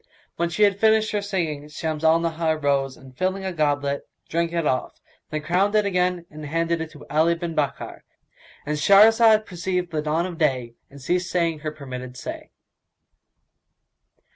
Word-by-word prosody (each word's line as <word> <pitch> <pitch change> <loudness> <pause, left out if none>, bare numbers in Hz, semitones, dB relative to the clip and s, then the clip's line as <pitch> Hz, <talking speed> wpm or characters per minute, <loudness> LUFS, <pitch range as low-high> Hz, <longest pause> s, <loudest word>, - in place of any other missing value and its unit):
When 170 0 -1
she 190 +5 +1
had 200 -1 +3
finished 220 0 +3
her 210 - 0
singing, 165 -8 -3
Shams 155 0 -4
al 160 +1 +5
Nahar 165 -1 0
rose 140 -2 0
and, 130 -1 -15
filling 190 +4 -1
a 190 - -2
goblet, 145 -3 -1 0.2
drank 170 +1 0
it 170 -2 -1
off, 130 -3 -1 0.3
then 155 -1 -4
crowned 185 +6 +1
it 210 -1 +3
again 180 -2 0
and 155 0 -9
handed 165 +2 0
it 160 - -4
to 150 -1 -13
Ali 160 +4 +2
bin 170 -1 -4
Bakkar;—And 150 0 -6
Shahrazad 215 +4 +6
perceived 180 -1 -3
the 155 -2 -1
dawn 155 +3 0
of 175 -2 -7
day 130 -6 0 0.2
and 140 - -13
ceased 175 +6 -1
saying 170 -3 0
her 155 0 -4
permitted 130 -4 -8
say. - - -7
165 Hz, 165 wpm, -23 LUFS, 150-180 Hz, 0.3 s, Shahrazad